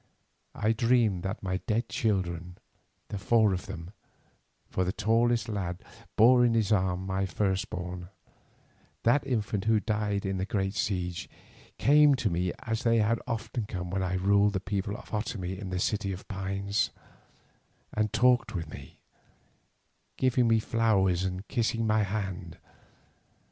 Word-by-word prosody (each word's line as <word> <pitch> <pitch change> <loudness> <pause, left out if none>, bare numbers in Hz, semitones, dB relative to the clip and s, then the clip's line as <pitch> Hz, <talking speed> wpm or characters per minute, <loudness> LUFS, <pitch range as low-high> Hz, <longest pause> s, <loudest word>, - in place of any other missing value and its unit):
I 110 - +1
dreamed 115 -4 +2
that 95 +4 -4
my 95 -1 -1
dead 115 +3 0
children, 90 -5 -2 0.5
the 100 - -4
four 110 +1 +3
of 90 - -4
them, 85 +2 -7 0.8
for 95 - -1
the 90 - 0
tallest 115 +3 +2
lad 95 -5 -3 0.3
bore 125 +3 +6
in 120 -1 +3
his 110 -3 +1
arms 95 -2 +1
my 95 0 0
firstborn, 90 -2 -2 0.9
that 135 +4 +3
infant 105 -5 -1
who 110 -1 +4
died 105 -1 -1
in 95 -1 -1
the 95 - -1
great 95 -1 -1
siege, 90 -4 -2 0.5
came 150 0 +6
to 115 -7 -1
me 90 +1 0
as 115 -3 -2
they 115 -1 +3
had 115 +1 +2
often 115 -1 -3
come 90 -2 -5
when 95 0 -1
I 95 0 -1
ruled 100 +2 +3
the 95 - 0
people 100 +2 -3
of - - -12
the 105 - 0
Otomie 95 -4 -4
in 100 -2 -6
the 90 - -2
City 100 +1 0
of 95 0 -7
Pines, 100 0 -1 1.0
and 105 -1 0
talked 120 +1 +3
with 85 -3 -4
me, - - -11 1.2
giving 125 -2 +3
me 115 0 +4
flowers 100 -6 +2
and 95 +1 -4
kissing 115 0 0
my 110 0 +3
hands. 95 -4 -3
100 Hz, 155 wpm, -29 LUFS, 95-115 Hz, 1.2 s, bore